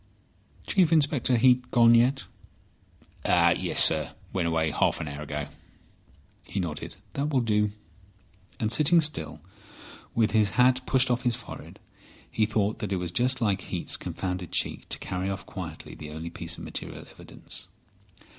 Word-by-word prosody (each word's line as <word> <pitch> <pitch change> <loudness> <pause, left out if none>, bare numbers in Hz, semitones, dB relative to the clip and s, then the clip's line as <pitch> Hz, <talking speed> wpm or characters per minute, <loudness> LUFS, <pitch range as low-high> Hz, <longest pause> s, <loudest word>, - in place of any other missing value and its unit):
"Chief 180 -4 +3
Inspector 145 -5 +3
Heat 125 +1 +4
gone 115 -1 +6
yet?" 125 +3 +4 1.0
"Yes, - - +3
sir. - - +1 0.2
Went 90 -3 0
away 80 -1 +1
half - - +1
an 80 - -4
hour 70 +1 -6
ago." 75 -1 -4 1.0
He 100 - -4
nodded. 80 -5 -4 0.2
"That 140 +2 -1
will 135 -4 +2
do." 105 -2 +2 0.9
And 110 -1 0
sitting 150 +7 +5
still, 80 - -2 0.7
with 110 -3 +3
his 105 -1 +3
hat 125 +1 +4
pushed 130 -1 +3
off 120 +1 +1
his 120 -2 +1
forehead, 115 -3 -10 0.5
he 110 -1 +2
thought 110 -1 0
that 105 - -4
it - - +2
was 90 -1 -3
just 125 +5 +2
like 100 -4 +1
Heat's 90 -2 -4
confounded 90 -2 -4
cheek - - -2
to - - -2
carry 90 +1 -3
off 95 -1 -4
quietly 85 -5 -7
the 75 - -9
only 80 +2 -6
piece - - -5
of - - -9
material - - -6
evidence. - - -9
110 Hz, 155 wpm, -27 LUFS, 90-125 Hz, 1.0 s, gone